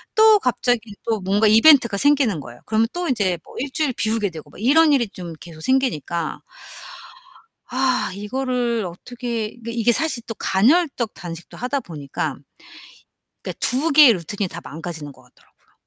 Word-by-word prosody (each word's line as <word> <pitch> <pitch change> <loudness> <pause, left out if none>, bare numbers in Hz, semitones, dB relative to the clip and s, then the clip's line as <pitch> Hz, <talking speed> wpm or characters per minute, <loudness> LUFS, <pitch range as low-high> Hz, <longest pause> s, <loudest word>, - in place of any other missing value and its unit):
또 435 -1 +7
갑자기 245 -3 +1 0.3
또 225 -2 0
뭔가 200 +3 +2
이벤트가 235 -1 +6
생기는 270 - +2
거예요. 120 -3 -11
그러면 220 +1 +1
또 350 -1 -3
인제 190 -9 0
뭐 - - -15
1 270 +2 -4
주일 300 -4 -1
비우게 215 -2 0
되고 160 -3 -11
막 - - -15
이런 300 +5 +5
일이 240 -5 +2
좀 175 -4 -9
계속 160 -2 -12
생기니까 175 - -1 1.3
아 255 -3 0
이거를 240 +1 -2
어떻게 230 +4 -5
그러니까 235 -1 -9
이게 235 0 +2
사실 305 -4 -1
또 225 - -5
간헐적 250 - +1
단식도 170 -1 -9
하다 260 +3 -2
보니까 145 - -5 1.1
그니까 - - -6
2 285 +6 +2
개의 285 -4 +8
루틴이 195 +2 -3
다 170 +1 -8
망가지는 155 -1 -7
것 130 - -20
같더라고요. 125 - -29
230 Hz, 335 characters per minute, -21 LUFS, 180-260 Hz, 1.3 s, 개의